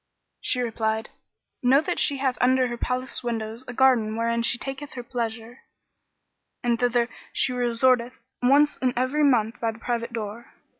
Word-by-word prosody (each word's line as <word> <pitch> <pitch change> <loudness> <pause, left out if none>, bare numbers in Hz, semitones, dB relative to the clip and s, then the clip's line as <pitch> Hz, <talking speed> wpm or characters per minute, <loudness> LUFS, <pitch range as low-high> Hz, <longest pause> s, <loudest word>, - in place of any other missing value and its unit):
She 250 - 0
replied, 220 -2 -2 0.5
"Know 250 +1 +4
then 355 - -3
that - - -1
she 285 - +4
hath 265 -2 0
under 255 0 +4
her 240 - -3
palace 255 +2 -2
windows 225 0 -4
a 245 - -6
garden 240 -4 +3
wherein 230 0 0
she 235 +1 +2
taketh 270 +3 -6
her 245 - -6
pleasure; 235 0 -5 1.0
and 235 -1 +1
thither 245 -1 +2 0.2
she 250 - +1
resorteth 245 +1 +1 0.2
once 285 +4 +4
in 255 -1 0
every 260 +4 +1
month 240 -4 +2
by 230 - 0
the 225 - -13
private 235 0 -3
door. 225 0 -6
245 Hz, 165 wpm, -25 LUFS, 230-255 Hz, 1.0 s, Know